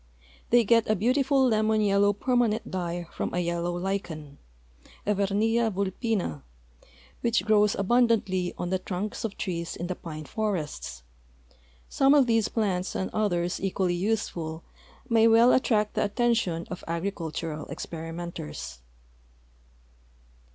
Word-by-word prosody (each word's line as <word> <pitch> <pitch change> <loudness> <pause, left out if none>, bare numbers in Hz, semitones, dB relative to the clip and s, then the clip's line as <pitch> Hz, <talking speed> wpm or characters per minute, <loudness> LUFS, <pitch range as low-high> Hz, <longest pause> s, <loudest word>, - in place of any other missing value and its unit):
They 240 0 +5
get 230 +1 +3
a 215 - +4
beautiful 265 +5 +3
lemon 220 -1 +2
yellow 205 -1 +4
permanent 235 0 0
dye 175 -1 -3
from - - -2
a - - -1
3^ellow 170 +1 -1
lichen, 165 -7 -4 0.7
Evernia 210 +3 +2
vidpinn, 195 - -2 0.8
which 235 -1 +1
grows 210 -1 +4
al)un 240 +5 +3
dantly 190 -6 0
on 175 - -3
the 185 - +1
trunks 195 +5 -4
of 220 -3 -4
trees 170 -4 -3
in 175 - -4
the 180 - -2
i)ine 155 -3 -8
forests. 165 - -3 0.8
Some 275 +1 +4
of 280 -3 +6
these 225 -2 +2
plants 190 -5 -1
and 190 - -2
others 175 -5 0
equally 190 -2 0
useful 175 -5 -2 0.4
may 230 -2 +5
well 230 +2 +6
attract 215 -5 +2
the - - +1
attention 210 -6 0
of 180 - -6
agricultural 165 -3 -3
exi)erimenters. 165 - -6
200 Hz, 125 wpm, -27 LUFS, 175-225 Hz, 0.8 s, of